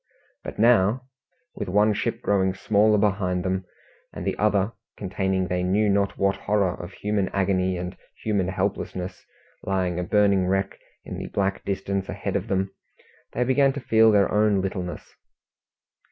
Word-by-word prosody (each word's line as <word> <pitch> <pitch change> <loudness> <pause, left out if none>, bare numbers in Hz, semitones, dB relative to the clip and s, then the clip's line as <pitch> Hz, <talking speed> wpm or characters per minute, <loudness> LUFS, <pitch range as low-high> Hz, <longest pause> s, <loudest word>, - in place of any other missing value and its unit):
But - - -7
now 115 +1 +4 0.5
with - - -5
one 105 +3 +4
ship - - -2
growing 95 -2 +2
smaller 105 +2 +3
behind 95 -3 0
them, 95 0 -1 0.5
and - - -7
the - - 0
other, 105 -1 +2 0.3
containing 95 -1 -1
they 90 0 -1
knew 100 +4 +2
not 100 0 +1
what 100 0 +2
horror 100 -3 +1
of 90 - -9
human 105 -2 -1
agony 95 -1 0
and 90 +1 -5 0.3
human 100 -4 +1
helplessness, 95 -1 -3 0.4
lying 90 -2 -1
a - - -1
burning 100 0 +3
wreck 95 +1 -1 0.3
in - - -6
the - - -5
black 95 -1 -1
distance 100 -1 -2
ahead 95 0 -3
of 100 +2 -1
them 95 -1 -1 0.6
they 125 - +1
began 135 +2 +3
to 140 - -4
feel 115 -3 +4
their 100 -2 +3
own 105 -1 +3
littleness. 95 -2 -4
100 Hz, 155 wpm, -25 LUFS, 95-105 Hz, 0.6 s, now